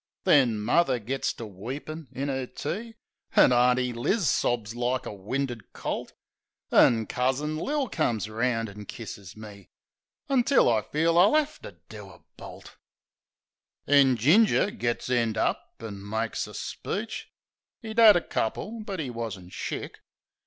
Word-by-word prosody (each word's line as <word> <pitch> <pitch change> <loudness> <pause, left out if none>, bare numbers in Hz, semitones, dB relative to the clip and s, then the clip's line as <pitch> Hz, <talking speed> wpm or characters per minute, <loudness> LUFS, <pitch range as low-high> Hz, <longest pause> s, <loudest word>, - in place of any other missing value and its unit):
Then 125 -6 +4
muvver 130 +5 +2
gits 130 +4 -2
to 115 - -8
weepin' 135 - -7
in 140 +2 -4
'er 130 -1 -3
tea; 225 - -5 0.4
An' 125 - +6
Auntie 125 0 +3
Liz 155 - 0
sobs 115 -3 0
like 120 0 -1
a - - -5
winded 120 +4 -4
colt; - - -4 0.6
An' 115 -2 +5
Cousin 135 +6 -1
Lil 280 - -1
comes 115 - -1
'round 115 +1 -1
an' 105 +1 -10
kisses 100 -4 -9
me; 105 -3 -12 0.6
Until 270 -1 +3
I 110 - +2
feel 165 +8 +1
I'll 200 +9 +5
'ave 305 -1 +2
to - - -11
do - - -10
a - - -17
bolt. - - -12 1.1
HITCHED - - -16
81 140 -1 +6
Then 130 -2 +2
Ginger 200 - +4
gits 120 - -2
end 115 -3 +1
up - - 0 0.2
an' 100 -3 -8
makes 110 +1 -2
a - - -11
speech - - -5 0.3
— - - -53
('E'd 220 +1 -3
'ad 220 -2 +9
a 175 - +3
couple, 215 - -3
but 195 -4 -5
'e 135 -6 -3
wasn't 110 -6 -6
shick). - - -5
125 Hz, 155 wpm, -27 LUFS, 110-165 Hz, 1.1 s, ad